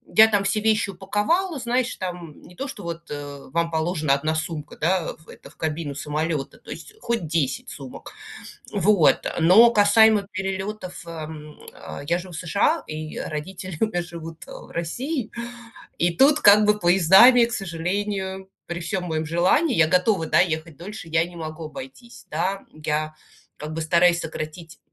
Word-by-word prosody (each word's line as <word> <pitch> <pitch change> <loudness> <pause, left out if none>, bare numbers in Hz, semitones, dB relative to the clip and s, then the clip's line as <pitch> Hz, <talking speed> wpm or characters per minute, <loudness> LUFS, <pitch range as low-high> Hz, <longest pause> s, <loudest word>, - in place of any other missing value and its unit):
я 220 0 +9
там 205 -2 +1
все 215 +2 0
вещи 215 -1 +1
упаковала, 210 - -1
знаешь, 250 +1 -1
там, 175 -4 -7
не 180 - -15
то, 275 - -4
что 230 -7 -9
вот, 170 0 -5
э, 145 -2 -7
вам 170 +2 0
положена 160 -2 0
1 155 +3 0
сумка, 155 -2 -5
да, 170 +1 0
в 160 - -22
это - - -13
в - - -21
кабину 155 -2 -3
самолета, 150 0 -3
то - - -18
есть 435 - -9
хоть 230 -7 -2
10 150 -4 -1
сумок. 135 -3 -10 0.6
Вот, 195 -4 +3
но 200 +9 +7
касаемо 210 -1 +5
перелетов, 190 -1 -5
эм, 155 -2 -8 0.2
а, - - -9
я 170 +2 +1
живу 180 0 -9
в - - -5
США, 200 - +1
и 155 0 -6
родители 175 +3 -6
у - - +4
меня 175 -5 -2
живут, 165 -1 -9
э, - - -13
в - - -11
России. 240 - -3 0.7
И 170 0 +1
тут, 290 +2 +5
как 210 -1 +7
бы, 210 0 +3
поездами, 195 +8 +7
к 235 - -6
сожалению, 190 +1 -3 0.2
при 175 0 -5
всём 185 +2 -3
моем 160 -2 -2
желании 185 - +2
я 160 -1 +5
готова, 180 0 +2
да, - - +3
ехать 160 -3 -1
дольше, 175 -2 -9
я 160 +1 +2
не 175 0 -12
могу 160 -1 -6
обойтись, 245 - -11
да. 185 +5 -1
Я, 155 0 -2 0.4
как 155 +1 -7
бы, 165 - -3
стараюсь 170 +2 +3
сократить 160 -1 -7
175 Hz, 170 wpm, -23 LUFS, 160-205 Hz, 0.7 s, я